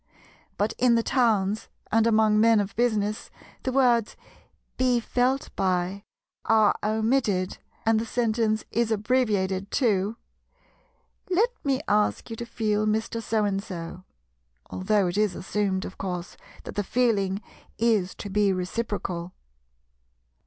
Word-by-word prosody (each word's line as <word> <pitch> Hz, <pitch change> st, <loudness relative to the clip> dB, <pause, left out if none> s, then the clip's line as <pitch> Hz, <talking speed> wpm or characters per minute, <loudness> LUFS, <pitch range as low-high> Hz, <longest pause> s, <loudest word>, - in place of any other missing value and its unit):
But 205 Hz, +2 st, 0 dB
in 245 Hz, -1 st, +4 dB
the 230 Hz, -, +2 dB
towns, 220 Hz, -5 st, +1 dB, 0.2 s
and 225 Hz, +1 st, +4 dB
among 215 Hz, -1 st, +4 dB
men 225 Hz, 0 st, +5 dB
of 200 Hz, -1 st, -3 dB
business, 215 Hz, -3 st, 0 dB, 0.3 s
the 260 Hz, -, -2 dB
words 245 Hz, -4 st, +2 dB, 0.6 s
"be 250 Hz, -2 st, +2 dB
felt 250 Hz, +3 st, 0 dB
by" 185 Hz, +1 st, -1 dB, 0.4 s
are 220 Hz, -2 st, +4 dB
omitted 215 Hz, -3 st, 0 dB, 0.3 s
and 225 Hz, -1 st, +3 dB
the 225 Hz, -, -2 dB
sentence 225 Hz, -2 st, 0 dB
is 235 Hz, 0 st, +1 dB
abbreviated 205 Hz, -4 st, 0 dB
to, 215 Hz, -3 st, +1 dB, 1.1 s
"Let 405 Hz, +7 st, +3 dB
me 275 Hz, -2 st, 0 dB
ask 210 Hz, +2 st, +1 dB
you -, -, -3 dB
to 235 Hz, -, -6 dB
feel 215 Hz, -2 st, 0 dB
Mr. 220 Hz, +2 st, -1 dB
So 220 Hz, -1 st, 0 dB
and 195 Hz, -1 st, 0 dB
so"; 180 Hz, -2 st, -7 dB, 0.7 s
although 200 Hz, +1 st, +1 dB
it 180 Hz, +3 st, -1 dB
is 210 Hz, -4 st, +1 dB
assumed, 195 Hz, -1 st, -1 dB
of -, -, -9 dB
course, 180 Hz, -2 st, -4 dB, 0.3 s
that -, -, -7 dB
the 205 Hz, -, -1 dB
"feeling" 200 Hz, -4 st, +1 dB, 0.4 s
is 215 Hz, -5 st, +1 dB
to 205 Hz, -, -7 dB
be 205 Hz, 0 st, +3 dB
reciprocal. 185 Hz, -2 st, -3 dB
215 Hz, 130 wpm, -26 LUFS, 195-230 Hz, 1.1 s, men